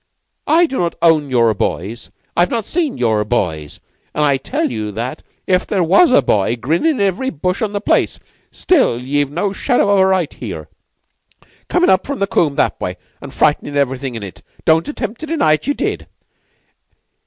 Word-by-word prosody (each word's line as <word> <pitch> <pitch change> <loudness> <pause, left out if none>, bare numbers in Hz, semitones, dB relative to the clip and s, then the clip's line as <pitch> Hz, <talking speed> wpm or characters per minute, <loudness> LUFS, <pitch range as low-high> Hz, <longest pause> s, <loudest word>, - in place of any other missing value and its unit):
I 330 +4 +5
do 270 -5 -3
not 170 -1 -1
own 155 -4 +4
your 115 -3 +3
boys. 105 +3 -4 0.3
I've 175 +1 +3
not 230 -4 -2
seen 320 -6 -1
your 110 -3 +1
boys, 85 -10 -2 0.4
an' 150 - +1
I 140 -2 +3
tell 295 - -2
you 105 -1 -4
that 120 +8 -4 0.2
if 185 -1 +1
there 190 -4 +1
was 195 - +5
a 145 - +5
boy 105 0 +1
grinnin' 160 - +1
in - - -5
every 200 +6 0
bush 180 - -2
on 215 -2 -1
the 205 -1 -3
place, - - +1 0.3
still 295 - +2
ye've 140 +2 -1
no 185 +7 -2
shadow 225 -3 +1
of 200 - +3
a 190 - +5
right 185 -5 0
here, - - -7 1.0
comin' 360 0 +3
up 190 - +2
from 280 0 -3
the 200 - +1
combe 155 -7 +1
that - - 0
way, - - -3 0.2
an' - - -8
frightenin' 145 0 0
everything 135 -2 -1
in 110 - -6
it. 95 -4 -9 0.2
Don't 160 +1 +3
attempt 235 -6 -5
to 315 - -6
deny 300 - +2
it. 155 - -2
Ye 285 - +1
did. - - -3
170 Hz, 190 wpm, -17 LUFS, -, 1.0 s, I